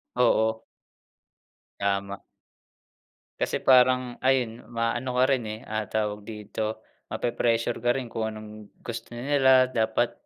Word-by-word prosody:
Oo. 110 -2 +2 1.2
Tama. 100 0 -1 1.2
Kasi - - 0
parang 125 -1 +4
ayun 125 -4 0
maano 120 +2 -2
ka 125 - +5
rin 130 -3 +1
eh, 110 0 -5
ah, 110 -3 -3
tawag 105 -1 -1
dito, 110 0 -5 0.2
mape-pressure 120 0 0
ka 120 +2 +2
rin 135 - -3
kung 110 -1 -1
anong 110 -1 -8 0.3
gusto 115 0 -6
nila 130 0 +4
dapat, 115 -1 0
115 Hz, 115 wpm, -26 LUFS, 110-125 Hz, 1.2 s, ka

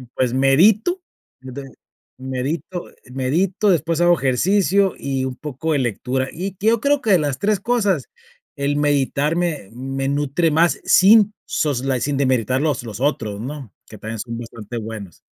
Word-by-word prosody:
pues, 125 -2 0
medito, 190 - +3 1.2
medito, 130 +7 -4 0.3
medito, 170 +11 0
después, 165 -2 +1
hago 175 0 +5
ejercicio 190 +8 +2
y 135 -1 -2
un 130 -1 -4
poco 150 +2 -3
de 145 - +1
lectura. 130 +2 -1
Y 190 +3 -5
yo 220 +2 +2
creo 285 +1 +2
que 220 - 0
de 185 - +5
las 145 -3 -2
3 210 -1 +1
cosas, 205 - 0 0.5
el 140 +1 0
meditar 145 +1 +1
me 170 - -2
me 135 +2 -4
nutre 145 +4 +1
más, 165 +3 +2
sin 210 +2 +6
sos 140 -4 -1
la 135 -2 0
sin 145 +3 -1
desmeritar 130 -1 +1
los 145 -5 0
los 110 +1 -8
otros, 110 -8 -1
¿no? 135 -4 -7
Que - - -12
también 110 +1 -6
son 115 0 -5
bastante 115 -1 -8
buenos. 110 -6 -8
145 Hz, 155 wpm, -20 LUFS, 130-175 Hz, 1.2 s, sin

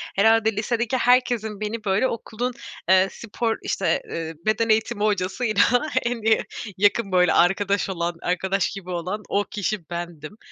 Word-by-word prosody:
herhâlde 220 +2 +4
lisedeki 235 +3 -1
herkesin 240 -4 +2
beni, 215 +1 -4
böyle, 200 +5 +2
okulun, 235 +1 -4 0.4
eee, 190 0 +6
spor, 230 0 -3
işte, - - 0
eee, 165 -1 -4
beden 220 +1 +1
eğitimi 220 -1 +1
hocasıyla 205 +2 +1 0.4
en 235 -1 -2
iyi 220 0 +3 0.3
yakın 205 +1 +2
böyle 180 -2 +4
arkadaş 195 +3 +2
olan 170 -2 -2
arkadaş 190 +2 0
gibi 195 -3 -8
olan 180 +4 -3
o 205 - +1
kişi 205 -3 -4
bendim. 170 +1 -6
205 Hz, 145 wpm, -23 LUFS, 185-225 Hz, 0.4 s, eee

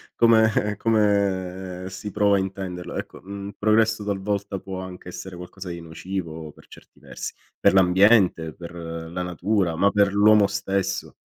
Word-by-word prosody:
come 110 -3 +3
come 95 -4 0
si 95 +3 -7
prova 100 0 +3
a - - +1
intenderlo. 95 -2 -5
Ecco, - - -6
mhmm, 100 +1 -7
progresso 110 0 +2
talvolta 100 -1 -2
può 95 -1 -6
anche 90 -1 -8
essere 95 +1 -8
qualcosa 90 +2 -9
di 85 0 -6
nocivo 80 -2 -6
per - - -19
certi - - -17
versi, - - -7 0.3
per - - +4
l'ambiente, 95 -3 +4
per 85 0 -10
la 85 +1 -5
natura, 90 0 0
ma 100 +5 +3
per 100 -1 +3
l'uomo 105 0 +6
stesso. 95 -1 -2
95 Hz, 150 wpm, -24 LUFS, 90-100 Hz, 0.3 s, l'uomo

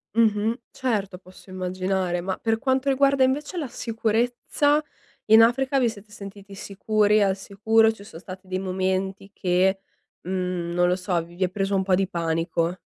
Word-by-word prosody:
Mh-mh, 225 +1 +2
certo 205 -7 -2
posso 185 +1 -17
immaginare, 185 -1 -2
ma 190 +1 -3
per 225 0 -1
quanto 265 +1 0
riguarda 275 0 +3
invece 290 +7 -1
la 305 -5 -2
sicurezza, 240 +6 0 0.4
in 220 +1 +8
Africa 260 +4 +3
vi 245 -3 +2
siete 210 -1 -12
sentiti 200 0 -11
sicuri? 210 +2 +1
Al 195 -1 +2
sicuro? 220 +3 +2
Ci 220 -2 -12
son 200 -5 -11
stati 185 +1 -11
dei 185 0 -2
momenti 190 +1 -2
che, 190 +1 +1 0.4
mhmm, 180 -1 -3
non 175 0 +3
lo 180 - +2
so, 180 0 -4
v - - -12
vi 185 - -1
è 180 - +1
preso 195 +1 -1
un 190 - +2
po' 190 -1 +2
di 190 +1 0
panico? 165 0 -1
195 Hz, 170 wpm, -24 LUFS, 185-225 Hz, 0.4 s, in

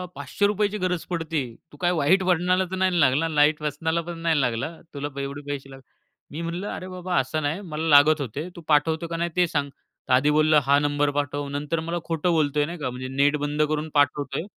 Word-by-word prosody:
₹500ची 205 +8 0
गरज 180 -3 -2
पडते. 165 -3 -2 0.3
तू - - -15
काय 175 0 +3
वाईट 185 +7 +3
वळणाला 180 +1 +2
तर - - -2
नाही 185 -2 +1
लागला? 145 +3 +3
वाईट 150 +1 +4
व्यसनाला 160 +3 -1
पण 170 0 -7
नाही 165 -3 +2
लागला 120 +4 -1
ना? 165 - -15
तुला 145 0 -4
एवढे 140 +1 -5
पैसे 135 -1 -6
लागले." 135 0 -13 0.5
मी 155 +3 -5
म्हणलं 170 +4 -4
"अरे 185 - -7
बाबा 180 -1 -4
असं 155 +4 -2
नाही 155 +7 -2
मला 160 -3 -4
लागत 150 +1 +6
होते. 140 +7 -4
तू 170 - -9
पाठवतो 160 +2 +2
का 165 0 -4
नाही 170 +1 -1
ते 180 -1 +3
सांग." 145 -3 -1 0.4
आधी 140 +4 +4
बोललं 155 0 +4
"हां, 140 +1 +4
नंबर 145 0 +1
पाठव." 145 0 -3
नंतर 145 +3 -2
मला 170 +2 -3
खोटं 165 +1 0
बोलतोय 150 -2 +2
नाही 170 +3 -6
का 130 - -2
म्हणजे 130 +1 -6
नेट 145 +1 +3
बंद 145 +1 -2
करून 155 +1 -2
पाठवतोय. 145 0 +1
155 Hz, 210 wpm, -24 LUFS, 145-170 Hz, 0.5 s, लागत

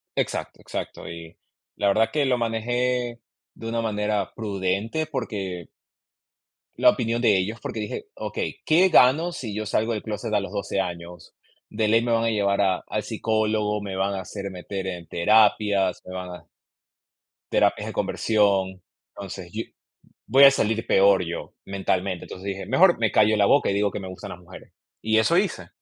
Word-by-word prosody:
Exacto, - - -3
exacto, - - -6
y 85 -1 -9 0.4
la 100 - +1
verdad 110 +3 +3
que 150 - +2
lo 125 -2 +2
manejé, 120 +1 -1 0.4
de 115 - -8
una 115 0 -1
manera 105 -2 -1
prudente, 100 +7 -2
porque 100 - -4 1.1
la - - +6
opinión 115 0 0
de 105 -5 +4
ellos, 105 +5 -2
porque 110 - -5
dije: 110 - -5
"Okey, - - -4
¿qué 175 +4 +5
gano 160 +3 +5
si 120 -10 -6
yo 110 0 -3
salgo 110 +2 0
del 105 - -3
clóset 110 0 -4
a 105 - +4
los 100 - -6
12 100 -1 -2
años?, 85 -2 -7 0.4
de 110 - 0
ley 115 +2 +4
me 120 - -1
van 115 0 +2
a 115 - +2
llevar 100 -2 +1
a 95 -2 +1
al 105 - -2
psicólogo, 110 -1 0
me 100 -2 -5
van 95 +1 0
a 95 - -3
hacer 100 +2 -6
meter 95 +1 -5
en 90 -3 -6
terapias, 105 0 +3
me 90 - -8
van 90 0 -5
a 90 - -10 1.1
terapias - - +2
de - - -5
conversión. 100 -3 +1 0.3
Entonces 95 -3 -8
yo, 110 +1 -3 0.6
voy 135 +2 +7
a 140 - +10
salir 115 -4 0
peor 95 -1 +5
yo 85 0 -6
mentalmente", 95 -2 -2
entonces 95 +2 -9
dije: 95 -1 -4
"Mejor 170 - +4
me 110 -2 +1
callo 110 0 +4
la 100 - +4
boca, 140 +2 +3
y - - 0
digo 100 0 +1
que 100 - -5
me 95 - -7
gustan 95 - -8
las - - -8
mujeres", 90 +1 -14 0.3
y 110 0 +2
eso 165 +10 +3
hice. 170 - -1
105 Hz, 180 wpm, -24 LUFS, 95-115 Hz, 1.1 s, a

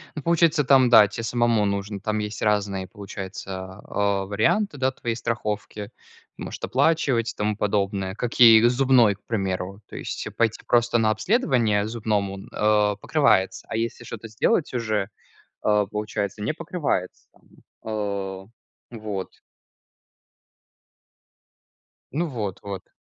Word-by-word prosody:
Ну, 150 - -4
получается, 165 -2 +3
там, 130 -2 +5
да, 110 -3 +8
те 115 +3 -6
самому 120 -2 +2
нужно 100 0 -2
там 110 +2 -2
есть 105 -1 -5
разные, 100 -3 0
получается, 95 -1 -8
а, 100 -1 0
варианты, 110 - +1
да, 130 0 +1
твоей 120 -3 -4
страховки. 105 -2 -4 0.5
Может - - -7
оплачивать 130 - +1
и - - -38
тому 105 0 -1
подобное. 100 -2 -1
Как 120 +1 -4
и 115 -2 +9
зубной, 125 -4 +4
к 100 - -30
примеру. 95 -2 -3
То - - -9
есть, - - -5
э, - - -6
пойти 115 -1 0
просто 120 0 +3
на 110 -2 +2
обследование 115 - +1
зубному, 105 -4 -2
а, 105 -1 +2
покрывается, 95 -6 +1
а - - -4
если 115 +1 -3
шо-то 115 0 -8
сделать 140 - +1
уже, 110 -5 -1 0.5
а, 105 -1 +2
получается- 105 0 -4
не 105 - 0
покрывается, 155 - -3
там. - - -28 0.4
А. 100 -3 -3 0.5
Вот. 105 -5 -5 2.8
Ну 165 +5 -1
вот. 105 - -4
Вот. 100 -2 -7
105 Hz, 135 wpm, -24 LUFS, 100-120 Hz, 2.8 s, и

